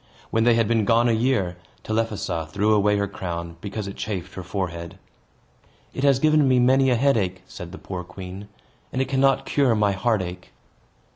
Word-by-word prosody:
When 115 0 +2
they 120 -1 +5
had 115 -2 +2
been 115 -1 +2
gone 115 +3 +3
a - - +3
year, 110 -7 +1 0.3
Telephassa 110 -7 -2
threw 105 +5 +2
away 105 0 +3
her 100 0 0
crown, 85 -3 -6
because 100 0 -5
it 100 - -7
chafed 95 -4 -4
her 95 - -6
forehead. 85 -3 -5 1.0
"It 130 - -4
has 140 -2 +5
given 155 0 +3
me 130 -1 +4
many 130 +2 +4
a 125 - +3
headache," 110 -8 +1
said 85 -1 -9
the 95 - -8
poor 90 -2 -6
queen, 95 +3 -9 0.4
"and 130 - -3
it 130 - +1
cannot 135 0 +2
cure 135 -5 +2
my 105 -1 +2
heartache." 95 -3 -2
105 Hz, 185 wpm, -23 LUFS, 95-125 Hz, 1.0 s, they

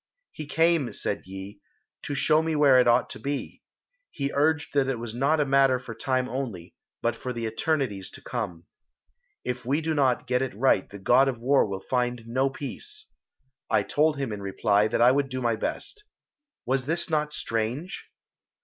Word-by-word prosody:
"He 155 - -8
came," 165 -3 +2
said 100 - -3
Yi, 95 +2 -8 0.5
"to 145 - -3
show 155 +3 +4
me 160 -1 -1
where 140 -3 +6
it 125 - +4
ought 120 +1 +4
to - - -8
be. 140 0 -4 0.5
He 140 -1 -3
urged 155 +1 +1
that 140 -2 +2
it 135 -2 -1
was 115 -1 -6
not 140 +6 +2
a 150 - +3
matter 135 -1 +4
for 125 -2 -8
time 130 +2 -1
only, 115 -10 -5 0.3
but 115 -1 +1
for 125 +2 -5
the 115 -2 -4
eternities 110 -4 -1
to - - -10
come. 95 -9 -4 0.8
If 125 0 -3
we 135 +6 +1
do 160 0 -1
not 135 -5 +2
get 125 0 +1
it 130 -5 -3
right 115 -4 +2
the 100 - -9
God 125 +7 +4
of 130 -3 -1
War 135 0 +3
will 95 -1 -5
find 125 -2 0
no 130 +4 +1
peace. 420 - -5 0.6
I - - +3
told 150 0 +1
him 135 -6 -2
in 100 - -6
reply 100 +1 +2
that 115 +1 +2
I 125 - +7
would 140 0 +1
do 130 0 -3
my 120 -2 +1
best. 420 - -4 0.6
Was 130 0 0
this 170 +2 0
not 150 -1 +1
strange?" 120 - -3
130 Hz, 190 wpm, -26 LUFS, 115-145 Hz, 0.8 s, I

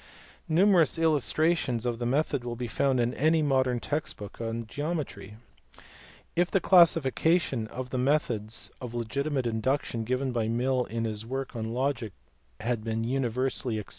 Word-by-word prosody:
Numerous 175 -1 +4
illustrations 155 -5 +1
of 120 -1 -1
the 120 - -1
method 140 0 0
will 120 -1 -4
be 125 +1 -4
found 130 +2 +1
in 120 +1 +1
any 155 +3 +2
modern 130 -3 +2
text 150 +5 -3
book 105 +2 -9
on 115 0 -3
geometry. 145 - -4 1.0
If 175 0 +2
the 195 - +2
classification 165 -7 +4
of 125 +3 -7
the 130 - -1
methods 125 -6 0
of 120 -2 -6
legitimate 130 +4 -1
induction 115 +1 -1
given 130 +3 -1
by 115 -3 -1
Mill 125 +2 +1
in 115 0 -3
his 110 -1 -3
work 135 +2 -5
on 110 -1 -3
logic 125 -4 -1 0.5
had 115 -1 -1
been 115 0 -2
universally 125 -1 -1
ac 105 - -3
PLATO. - - -20
125 Hz, 160 wpm, -28 LUFS, 115-145 Hz, 1.0 s, Numerous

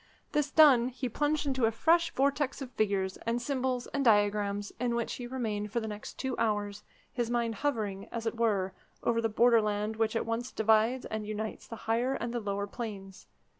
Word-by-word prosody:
This 295 -1 +1
done, 280 -6 +6
he 255 0 -4
plunged 295 +5 0
into 260 -4 +1
a - - +1
fresh 330 +8 +3
vortex 280 +1 +1
of 265 -3 -7
figures, 195 -4 0
and 230 +1 -2
symbols, 255 -1 -1
and 280 - 0
diagrams, 205 -2 +2
in 240 -1 0
which 235 -1 -1
he 245 - -6
remained 215 -5 -3
for 235 - 0
the 220 - -4
next 210 -1 -7
two 265 -1 -2
hours, 205 -2 -1 0.3
his 240 -2 -1
mind 235 -1 0
hovering, 210 -6 -2
as 230 -1 -4
it 225 - -1
were, 205 -5 +1 0.3
over 230 0 +2
the 225 - +1
borderland 215 -2 +2
which 225 0 +1
at - - 0
once 230 +2 -2
divides 220 +3 +2
and 215 -1 -4
unites 215 0 -5
the 230 - -7
higher 240 +4 +1
and 235 -1 -3
the 240 - -1
lower 200 -2 -2
planes. 200 -4 -7
230 Hz, 195 wpm, -30 LUFS, 210-250 Hz, 0.3 s, done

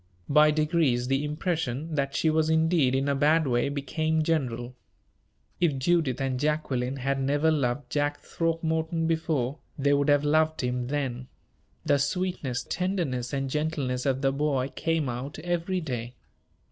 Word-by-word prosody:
By 150 +1 +6
degrees 150 -5 +1
the 135 +2 +1
impression 155 -1 -2
that 140 -2 -1
she 160 - +2
was 155 0 +2
indeed 160 -4 +3
in 135 +1 0
a 140 - +2
bad 155 +3 +3
way 120 0 +1
became 155 +3 -1
general. 125 -6 -1 0.9
If 165 -6 +2
Judith 150 -3 +1
and 135 -1 -1
Jacqueline 140 -4 -1
had 135 +1 -1
never 145 +4 +2
loved 130 -3 -1
Jack 145 +1 0
Throckmorton 165 0 -1
before, 160 -4 -1 0.2
they 140 0 +2
would 145 +1 +2
have 145 0 +4
loved 155 +1 +2
him 125 -1 -2
then. 130 -3 -3 0.6
The 140 - +3
sweetness, 140 -6 -2
tenderness, 165 -10 -2
and 135 -1 -1
gentleness 140 -3 -1
of 135 0 0
the 135 - +3
boy 140 -2 0
came 160 +2 -1
out 125 +4 -5
every 175 +3 -1
day. 125 -5 -5
145 Hz, 150 wpm, -27 LUFS, 130-160 Hz, 0.9 s, By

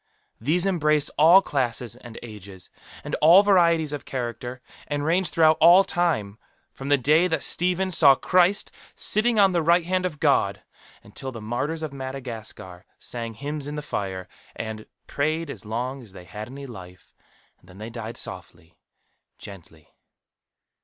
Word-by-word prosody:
These 160 - +1
embrace 155 -6 +1
all 170 +6 +6
classes 120 - -2
and 120 -2 -12
ages, 100 -5 -11 0.3
and - - -7
all 170 +6 +7
varieties 170 -6 +3
of 145 - -5
character, 125 0 -5 0.3
and 145 0 -3
range 175 +3 +2
throughout 160 -1 +3
all 175 +4 +8
time, 150 - -1 0.3
from 135 +1 -7
the 145 - +5
day 155 +7 +3
that 160 -4 -2
Stephen 180 +2 0
saw 145 -5 +6
Christ 185 +6 +2 0.2
sitting 220 +2 +1
on 195 -2 +5
the 175 -2 +1
right 170 +1 +3
hand 185 +1 0
of 150 -5 -10
God, - - +1 0.4
until 130 - -7
the 115 - -8
martyrs 140 +9 -3
of 155 -3 -5
Madagascar 115 -9 -8
sang 115 -2 -5
hymns 145 +3 -5
in 145 - -5
the 150 - -5
fire, 95 -8 -4 0.3
and 110 -1 -7 0.2
"prayed 155 +2 -2
as - - -10
long 125 +5 -4
as 110 -6 -15
they 90 -2 -12
had 105 +3 -8
any 140 +3 -9
life; 95 -7 -12 0.5
and 90 - -23
then 90 - -15
they 110 +3 -8
died, 115 0 -7
softly, 85 -1 -8 0.6
gently." 85 -5 -14
140 Hz, 160 wpm, -24 LUFS, 115-165 Hz, 0.6 s, all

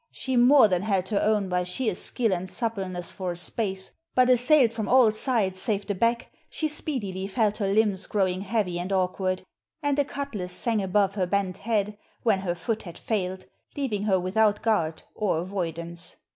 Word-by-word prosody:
She 260 -1 -3
more 250 0 +7
than 180 -3 0
held 195 -3 0
her 205 - +1
own 210 -2 +2
by 180 0 0
sheer 210 +5 0
skill 225 +3 -1
and 185 +1 -3
suppleness 190 -7 -3
for 185 -2 -3
a - - -8
space; 190 +1 -2 0.2
but 255 0 +5
assailed 250 0 +5
from 220 -2 -3
all 250 -4 +6
sides 215 -5 0
save 205 -4 -1
the 205 - -1
back 230 +5 0 0.2
she 315 - -1
speedily 210 -11 -3
felt 210 0 +1
her 205 -3 -1
limbs 205 -2 +2
growing 190 -3 0
heavy 195 -4 -1
and 180 +2 -4
awkward, 185 0 0 0.4
and 290 0 +1
a - - +5
cutlas 275 -10 -5
sang 225 +2 0
above 195 +1 +2
her 190 -3 -1
bent 195 -1 -1
head 210 -2 -1 0.2
when 220 -5 +3
her 180 -2 -2
foot 220 +6 -2
had 170 -3 -10
failed, 190 -4 -2 0.3
leaving 215 -8 -1
her 190 -3 +3
without 210 +3 +2
guard 170 -8 0
or 205 -6 0
avoidance. 170 -1 -4
200 Hz, 185 wpm, -26 LUFS, 185-230 Hz, 0.4 s, more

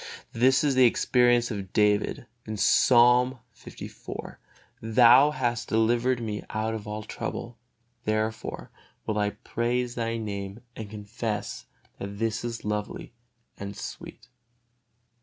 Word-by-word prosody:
This 130 +4 +4
is 145 -2 +2
the 130 -1 +6
experience 120 0 +3
of 100 -3 -6
David, 105 +5 +2 0.3
Psalm 125 +4 +5 0.3
liv: - - -8 0.4
"Thou 120 +5 +6
hast 120 -6 -1
delivered 120 +3 +2
me 105 -2 -4
out 110 +1 -2
of 110 -1 -6
all 105 0 -4
trouble, 115 +2 -6 0.5
therefore 110 +1 -2 0.3
will 105 -1 -1
I 105 0 +2
praise 120 +4 -2
Thy 115 -1 -2
Name 100 0 -5
and 110 -2 -7
confess 105 0 -5 0.3
that 100 - -4
it 100 +2 -9
is 115 +1 -2
lovely 105 +2 -4 0.5
and 100 0 -6
sweet." 120 - -8
115 Hz, 120 wpm, -27 LUFS, 105-120 Hz, 0.5 s, the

